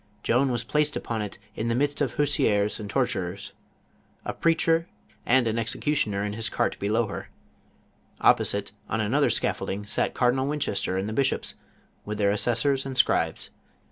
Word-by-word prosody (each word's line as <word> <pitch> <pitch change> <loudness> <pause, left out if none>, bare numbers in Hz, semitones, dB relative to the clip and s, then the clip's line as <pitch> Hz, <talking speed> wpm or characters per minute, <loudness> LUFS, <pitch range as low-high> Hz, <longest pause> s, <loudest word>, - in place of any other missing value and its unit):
Joan 130 +3 +3
was 120 -1 -1
placet! 150 +4 0
upon 115 -2 -3
it 105 -1 -5 0.2
in 110 - -2
the 115 - +1
midst 145 +3 0
of 135 -5 0
/////W 145 - +2 0.2
rv 105 +1 +1
and 105 -1 -6
tortures, 100 -6 -2 0.7
a - - -2
preacher, 165 0 +2 0.4
and 125 0 +4
an 115 0 0
exe 115 0 -1
cutioner 105 -10 0
in 105 - -3
his 110 +1 -1
cait - - -1
below 110 +4 +1
her. 100 - -7 0.9
Opposite, 100 -1 +3 0.2
on 110 - -1
another 130 +7 +2
scall'olding, 100 +2 -1
satf 100 - -1
Cardinal 130 +2 +2
Winchester 120 -10 -1
and 95 +2 -1
the 110 - -3
bishops, 135 +3 0 0.5
with 105 0 -4
their 100 -1 +3
assessors 125 +6 +1
and 135 -1 -5
scribes. - - +1
115 Hz, 170 wpm, -26 LUFS, 105-135 Hz, 0.9 s, and